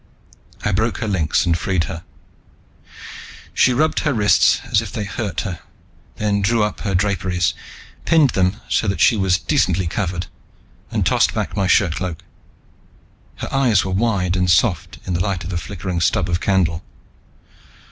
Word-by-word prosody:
I 105 - +1
broke 110 +4 0
her 115 - -3
links 90 -6 +1
and 85 -2 +2
freed 90 0 0
her. 85 +1 -6 1.5
She 130 - +4
rubbed 155 +6 +1
her 150 -4 0
wrists 105 -5 +4
as - - +4
if - - -7
they 105 - -3
hurt 100 0 -3
her, 90 -6 -5 0.6
then 105 -1 0
drew 110 +2 +2
up 105 - -2
her 100 -3 -2
draperies, 90 -2 0 0.5
pinned 155 -6 +4
them 95 +3 0
so 110 - 0
that 100 - -1
she 115 - +5
was 95 -3 +2
decently 95 - +1
covered, 90 0 -2 0.6
and - - -1
tossed - - +2
back - - -3
my 100 -2 0
shirtcloak. 90 -2 0 1.1
Her - - -7
eyes 125 -9 +3
were 95 - -3
wide 95 -3 0
and 90 -1 +1
soft 85 -3 +1
in 90 - -3
the 85 +1 0
light 95 -3 -2
of 90 - -6
the 85 - -2
flickering 90 -2 -4
stub 85 +1 +1
of 85 0 0
candle. 90 -3 +1
95 Hz, 165 wpm, -20 LUFS, 90-105 Hz, 1.5 s, she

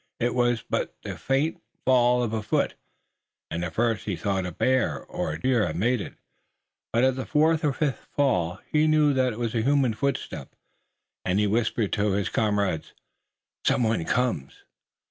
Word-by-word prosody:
It 120 0 +1
was 120 -3 +1
but - - -2
the - - -5
faint 150 +5 0 0.2
fall 125 -1 +4
of 115 -2 -2
a 110 - -1
foot, - - 0 0.8
and, 85 - -2
at 85 -1 -5
first, 115 -3 +1
he 100 - -1
thought 95 -1 -1
a - - -5
bear 130 +8 +1
or - - -4
a 80 - -5
deer 125 +1 +2
had 80 - -4
made 115 +6 +1
it, - - -8 0.8
but 115 +2 +2
at 130 -1 +3
the 130 - -3
fourth 160 +1 +3
or 150 - +3
fifth 140 0 -2
fall 90 - +1
he 155 0 +3
knew 155 -2 +4
that 130 -1 +2
it 110 - -7
was 115 -2 -2
a 115 - +1
human 135 -1 +2
footstep 125 - -3 0.7
and 90 - 0
he 105 - +3
whispered 110 0 0
to 100 -1 +1
his 100 0 0
comrades: 100 -6 0 0.7
"Some 125 - +2
one 110 -6 +1
comes!" 125 - -1
120 Hz, 185 wpm, -26 LUFS, 100-130 Hz, 0.8 s, fall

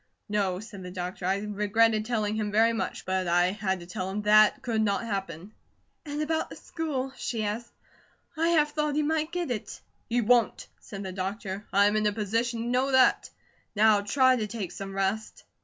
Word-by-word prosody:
"No," 200 -4 0
said 210 -2 -10
the 180 - -7
doctor. 180 0 -5
"I 190 +1 +2
regretted 210 +1 +1
telling 215 -3 -1
him 215 -1 -2
very 225 +2 +4
much; 225 - -4
but 185 -1 -1
I 175 +1 +3
had 190 -3 -2
to - - -9
tell 185 +1 -4
him 205 +2 -3
THAT 215 0 +5
could 225 -3 0
not 210 +1 0
happen." 195 -2 -5 0.5
"And 295 +1 -2
about 320 +1 -1
the - - -9
school?" 270 -5 -4
she 225 -3 -3
asked. 215 +3 -3 0.6
"I 330 +1 +1
half 305 -3 +3
thought 300 -1 0
he 305 - +2
might 310 +1 0
get 350 -6 -2
it." 215 -4 -5 0.3
"He 240 +1 +2
WON'T!" 235 0 +2
said 200 0 -8
the 190 - -5
doctor. 195 +1 -5
"I'm 200 +2 +4
in 215 0 +2
a - - +2
position 230 +3 -1
to - - -4
know 255 +3 +1
that. 260 -1 +4 0.5
Now 210 0 +5
try 260 +5 +3
to 215 -2 -2
take 210 -4 -5
some 195 0 -7
rest." 195 +3 -2
215 Hz, 195 wpm, -27 LUFS, 195-245 Hz, 0.6 s, THAT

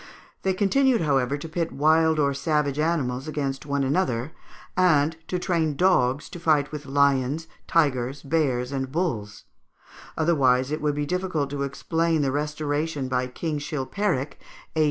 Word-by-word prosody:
They 190 -1 0
continued, 235 +5 +3
however, 140 -3 +1
to 150 - -7
pit 165 +1 -2
wild 160 +2 +3
or 140 -2 +2
savage 150 -1 0
animals 145 -5 0
against 140 -2 -3
one 140 -1 0
another, 135 -2 0 0.4
and 160 -4 +3
to 180 - -1
train 165 -4 0
dogs 145 -6 +2
to 175 - -8
fight 150 -3 +2
with 150 -2 -7
lions, 140 +2 +2 0.2
tigers, 140 -4 +1
bears, 135 -4 0
and 135 -1 -3
bulls; 130 - -2 0.7
otherwise 135 -5 +2
it 155 - -2
would 150 -1 0
be 145 0 -1
difficult 175 -4 -2
to 145 -1 -3
explain 160 +3 0
the 135 - +1
restoration 150 0 -2
by 125 0 0
King 150 +4 -3
Chilpéric 145 +1 -2 0.4
(A. - - 0
150 Hz, 150 wpm, -25 LUFS, 135-165 Hz, 0.7 s, continued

